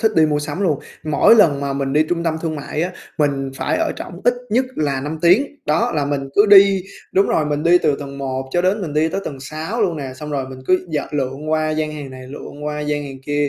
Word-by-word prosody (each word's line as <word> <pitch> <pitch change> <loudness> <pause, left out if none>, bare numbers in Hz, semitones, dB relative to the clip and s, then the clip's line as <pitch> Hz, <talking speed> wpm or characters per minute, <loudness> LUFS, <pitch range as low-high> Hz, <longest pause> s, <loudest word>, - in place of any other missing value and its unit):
thích 220 -1 +2
đi 155 - +6
mua 150 -1 +1
sắm 150 +4 -4
luôn. 155 -7 +1 0.3
Mỗi 155 +8 +5
lần 160 -11 +4
mà 140 -1 -2
mình 135 -1 -2
đi 150 +2 +4
trung 170 -1 0
tâm 160 -1 0
thương 160 -2 -2
mại 150 +2 -3
á, 180 - -2 0.3
mình 140 -2 0
phải - - -1
ở 325 -1 0
trỏng 175 +1 -8
ít 245 +1 +4 0.2
nhất 250 +5 +3
là 140 -3 0
5 150 +3 -4
tiếng. 190 +12 +5 0.2
Đó, 150 +2 +1
là 145 -2 +1
mình 140 -1 -2
cứ 205 +1 +5
đi 195 -2 +7 0.3
đúng 195 +1 +4
rồi, 155 - +1
mình 150 0 -1
đi 170 +2 +5
từ 145 -4 +1
tầng 140 -1 -7
1 130 -1 -3
cho 175 - +1
đến 190 +3 +1
mình 155 - -4
đi 155 +2 +2
tới 195 - -2
tầng 135 -3 -6
6 160 - -3
luôn 175 -5 0
nè, 135 -3 -5
xong 150 +3 -8
rồi 135 -3 -2
mình 130 - -9
cứ 185 0 +2
d 150 - +1 0.2
lượn 140 +2 -2
qua 155 0 +1
gian 155 0 -1
hàng 145 -3 -7
này, 130 0 -10
lượn 145 +1 -9
qua 150 0 -3
gian 150 0 -2
hàng 135 -1 -8
kia, 145 -1 +1
150 Hz, 265 wpm, -20 LUFS, 140-175 Hz, 0.3 s, đi